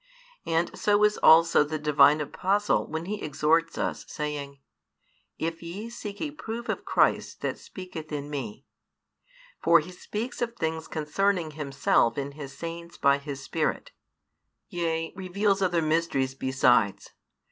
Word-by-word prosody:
And 165 +1 0
so 205 0 +2
is 210 0 +3
also 165 -1 +6
the 155 +1 -3
Divine 150 0 +5
Apostle 195 +7 0
when 160 +1 -4
he 210 +2 -4
exhorts 155 +3 +1
us, - - -2
saying, 145 -2 -5 0.8
If 165 0 -3
ye 195 +7 -7
seek 205 -3 -7
a 300 - -3
proof 235 -4 -6
of - - -2
Christ - - +1
that - - -2
speaketh 180 -5 -9
in 145 -1 -4
me; 135 -4 -6 1.0
for 170 0 +6
He 160 +4 -7
speaks 215 +7 -5
of 235 -1 -2
things 160 -5 -3
concerning 170 +2 0
Himself 140 -5 +1
in 140 0 -3
His 140 -2 -9
Saints 170 +1 -7
by 140 0 +3
His 140 -1 -7
Spirit; - - -2 0.8
yea, 165 -2 -2
reveals 195 +1 0
other 175 -3 +2
mysteries 155 -4 +1
besides. 130 -6 +2
160 Hz, 140 wpm, -27 LUFS, 145-185 Hz, 1.0 s, also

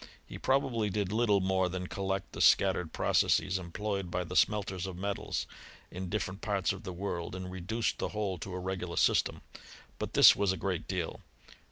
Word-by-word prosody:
He - - -9
probably 130 -5 +1
did 100 -1 -1
little 105 -3 +3
more 95 -1 +1
than 90 +1 -4
collect 95 0 -3
the - - -5
scattered 95 -4 +4
processes 95 0 +2
employed 95 +1 -3
by 90 +1 -1
the 90 +1 -7
smelters 95 -3 +1
of 90 -2 -6
metals, 100 +2 -2 0.5
in 90 0 -5
different 100 -1 -3
parts 100 -5 0
of - - -9
the 95 -5 -6
world, 90 -1 -4
and 90 0 -6
reduce 100 +6 -1
the - - -3
whole 100 -4 -2
to 95 -2 -6
a - - -3
regular 90 -1 -4
system. - - +2 0.6
But - - -4
this - - +9
was 100 -1 +2
a 95 - -2
great 95 -4 -2
deal. 90 -4 -3
95 Hz, 185 wpm, -31 LUFS, 90-100 Hz, 0.6 s, this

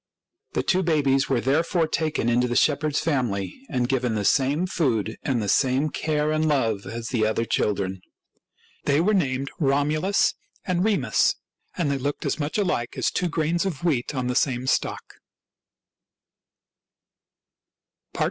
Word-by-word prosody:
The - - 0
two 185 0 +2
babies 140 -6 +2
were 130 -3 +1
therefore 165 - +1
taken 155 -7 -1
into 120 +1 +2
the 120 - -2
shepherd's 150 +2 +2
family 125 - -2
and 125 -3 0
given 125 -3 0
the 105 -1 -1
same 145 - +2
food 120 - 0
and 130 -4 0
the - - -3
same 135 +7 +2
care 150 -1 0
and 155 0 +1
love 115 -9 0
as 115 0 -5
the 115 -4 0
other 110 +1 0
children. 95 -4 -1 0.8
They 140 +1 +3
were 200 +6 +2
named 135 -7 0
Romulus 150 +6 +2 0.3
and 180 -1 0
Remus, 215 -1 +2 0.4
and 165 -6 0
they 140 - -1
looked 140 +2 -3
as - - -1
much 145 +5 -2
alike 180 - -1
as - - +1
two 180 - -1
grains 165 +1 0
of 170 -6 -4
wheat 150 -4 0
on 130 -1 -1
the 125 - -1
same 125 -1 0
stalk. - - -2
140 Hz, 150 wpm, -24 LUFS, 125-160 Hz, 0.8 s, They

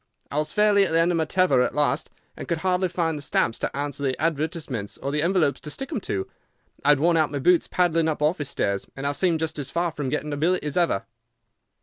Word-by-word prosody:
I 140 - -3
was 150 - -2
fairly 210 -1 +4
at 190 - 0
the 165 - +3
end 170 +2 +3
of 170 - +1
my 160 - +1
tether 185 -5 +3
at 125 - 0
last, 145 0 +1 0.3
and - - -8
could 170 - 0
hardly 185 0 +2
find 170 -2 -1
the 145 - -6
stamps 115 -4 0
to - - -3
answer 145 0 -3
the 135 -2 -1
advertisements 155 - -2
or 140 - -4
the 150 +1 0
envelopes 170 -4 +2
to 150 - -8
stick 270 - -5
them 275 -10 -3
to. 95 - -3 0.6
I - - +2
had 145 -2 +6
worn 170 +2 +3
out 155 -2 +2
my 145 - -3
boots 175 +5 +3
paddling 165 -3 +2
up 155 - -2
office 150 -1 0
stairs, 100 -1 -1
and 135 - -6
I 140 - +2
seemed 165 +1 +1
just 160 -1 -2
as 140 -2 -4
far 170 +2 -1
from 145 -4 -4
getting 150 +1 -2
a - - -3
billet 175 +5 +1
as 150 -2 -3
ever. 170 - +1
155 Hz, 255 wpm, -24 LUFS, 145-175 Hz, 0.6 s, had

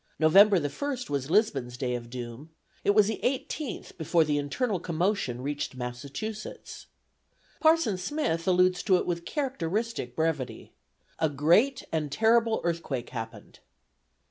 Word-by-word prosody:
November 195 +6 +6
the 145 -4 0
first 250 - -4
was 140 -1 -2
Lisbon's 140 - +1
day 125 -1 -1
of 120 -1 -5
doom; 120 +4 -7 0.3
it 205 - +3
was 210 -1 +6
the 220 +2 -3
eighteenth 270 0 -3
before 165 +1 +3
the 150 -1 0
internal 190 - -1
commotion 170 - -1
reached 145 -1 -3
Massachusetts. 135 - -6 0.7
Parson 315 - +3
Smith 180 - -2
alludes 180 0 +3
to 190 - +3
it - - -2
with 170 -1 -3
characteristic 225 - -2
brevity: 160 -5 -2 0.5
"A 160 - +2
great 175 - +3
and 155 -3 -1
terrible 225 +4 +3
earthquake 165 -8 -3
happened." 115 -3 -8
170 Hz, 135 wpm, -28 LUFS, 140-220 Hz, 0.7 s, November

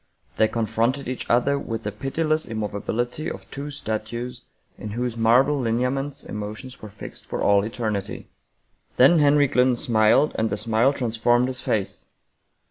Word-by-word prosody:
They 110 - +4
con 115 0 -1
fronted 115 +6 0
each 130 0 -4
other 140 +4 +2
with 115 -3 -5
the 105 - -3
pitiless 155 +8 -1
immovability 110 +6 -3
of - - -8
two 140 +2 -6
statues 120 0 -4 0.3
in 105 - -7
whose 120 +2 -3
marble 125 +5 +3
hneaments 130 +5 -1
emotions 105 +5 -7
were 110 - -8
fixed 100 0 -10
for - - -4
all 100 -1 +4
eternity. 110 -3 -4 0.7
Then 140 +7 +6
Henry 145 0 +5
Glynn 125 -1 +3
smiled 120 +3 +3
and 110 0 +1
the 105 - -2
smile 115 +4 +2
transformed 120 -1 +1
his 130 0 -5
face. 100 -3 -2
120 Hz, 150 wpm, -24 LUFS, 110-135 Hz, 0.7 s, Then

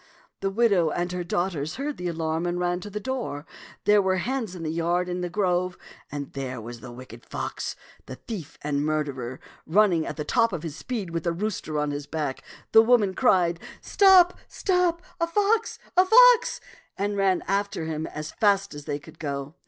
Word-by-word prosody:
The 195 - -1
widow 195 -6 +3
and 175 +3 -2
her 180 0 -3
daughters 170 -4 -2
heard 285 +2 -4
the 180 - -4
alarm 165 0 -1
and 175 0 -1
ran 175 0 0
to 205 - -8
the 210 +1 -4
door. 235 - -4 0.4
There 210 0 +6
were 190 -1 +1
the 185 - -1
hens 240 -6 -3
and 165 -2 -6
the 155 - -1
yard 170 +2 0
and 180 0 -3
the 175 - -2
grove, 180 -1 0 0.3
and 140 -1 -6
there 130 -3 -4
was 120 +1 -8
the 120 +2 -10
wicked 120 -1 -11
fox, - - -4 0.3
the 130 - -7
thief 165 - -8
and 145 -1 0
murderer, 140 -5 -2 0.3
running 175 -2 +3
at 150 - -5
the 150 - -3
top 230 -3 +2
of 170 - -4
his 160 -3 -5
speed 205 -1 -4
with 165 -1 -3
the 170 - 0
rooster 175 -4 -3
on 150 0 0
his 145 0 -5
back. 150 -4 -3 0.3
The 220 - +8
women 225 -4 +3
cried, 180 -8 +3 0.2
" - - -26
Stop, 375 -3 +6
stop! 360 -3 0 0.2
a 335 - +1
fox, 420 +5 +1 0.2
a 365 - +7
fox!" 485 +4 +6 0.4
and 205 +1 -1
ran 195 -2 +2
after 200 -3 -1
him 160 0 -3
as 155 +1 -6
fast 200 -3 +2
as 145 -1 -9
they 145 - -2
could 160 +2 -15
go. 140 -1 -4
175 Hz, 200 wpm, -26 LUFS, 155-210 Hz, 0.4 s, The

